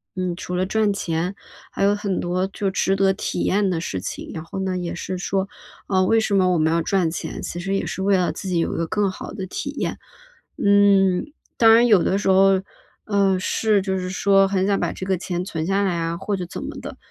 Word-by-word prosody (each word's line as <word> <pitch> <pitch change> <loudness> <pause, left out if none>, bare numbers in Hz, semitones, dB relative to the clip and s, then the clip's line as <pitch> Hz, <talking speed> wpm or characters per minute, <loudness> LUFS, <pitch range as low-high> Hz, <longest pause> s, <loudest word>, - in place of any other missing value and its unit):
嗯， 185 -2 -2
除 180 0 -5
了 185 +1 +1
赚 215 +2 +1
钱， 175 -1 -2 0.4
还 - - -2
有 200 +1 +4
很 200 -2 -2
多 180 +2 -1
就 195 0 -3
值 190 0 +1
得 195 0 +3
体 - - -3
验 200 0 +2
的 175 -3 -1
事 95 - -3
情。 95 - -6
然 160 - -6
后 165 - -8
呢 190 -1 -1
也 175 -1 -4
是 185 +1 -4
说， 190 +1 -1 0.4
呃， 185 -1 +2
为 225 - +4
什 220 -2 -1
么 185 -1 +3
我 - - +2
们 160 +1 +2
要 170 - +2
赚 175 -1 +1
钱， - - -5
其 175 - -5
实 195 +2 -2
也 - - -1
是 - - -4
为 195 0 +3
了 180 -1 +1
自 190 - -6
己 180 - 0
有 165 - 0
一 - - -4
个 165 0 -1
更 200 0 0
好 - - -8
的 190 -3 -5
体 280 +9 -5
验。 - - -3 0.6
嗯， 200 +2 +3 0.3
当 225 -1 +7
然 235 +1 +5
有 210 -6 +5
的 190 - +1
时 205 - -2
候， 190 0 +5 0.5
呃， 200 -2 +2
是 210 +2 +1
就 190 -1 -1
是 180 0 -4
说 195 +1 +3
很 190 -1 0
想 200 0 +1
把 - - -1
这 185 - -6
个 190 -1 0
钱 180 0 -3
存 160 -5 -3
下 195 +1 +1
来 190 -3 0
啊 165 0 -2
或 200 +2 -2
者 180 - -4
怎 - - -7
么 - - -6
的， - - -8
190 Hz, 265 characters per minute, -22 LUFS, 180-200 Hz, 0.6 s, 当